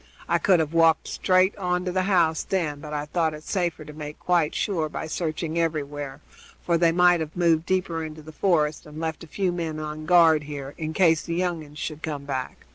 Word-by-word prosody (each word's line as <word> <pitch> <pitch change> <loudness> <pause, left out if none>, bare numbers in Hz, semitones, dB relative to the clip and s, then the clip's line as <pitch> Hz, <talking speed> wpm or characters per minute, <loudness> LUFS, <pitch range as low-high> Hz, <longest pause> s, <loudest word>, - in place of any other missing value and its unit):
I 170 - +2
could 185 -1 +4
have 160 0 -1
walked 165 -1 +4
straight 185 +1 +2
on 180 -2 -1
to 180 - -1
the 185 +1 +1
house, 165 -4 +3
then, 160 -7 -2
but 150 +1 -9
I 150 -1 -2
thought 160 0 0
it 150 - -11
safer 170 -5 -2
to 150 - -10
make 150 0 -7
quite 170 -4 +1
sure 165 -7 -1
by - - -5
searching 160 0 -2
everywhere, 145 -4 -3 0.4
for 170 - +1
they 165 0 +4
might 175 0 +5
have 160 +1 -5
moved 165 -2 +2
deeper 180 -3 0
into 155 0 -8
the 155 - -10
forest, 155 -3 +1
and 150 +1 -9
left 160 -1 -3
a - - -10
few 185 +3 -1
men 165 -3 -3
on 155 0 -6
guard 165 -3 +6
here, 140 -1 -6
in 160 0 -4
case 165 -3 +4
the 165 - -4
young 175 -2 -1
uns 150 0 -14
should 155 0 -5
come 145 -3 -4
back. 130 -2 -5
160 Hz, 220 wpm, -25 LUFS, 150-175 Hz, 0.4 s, guard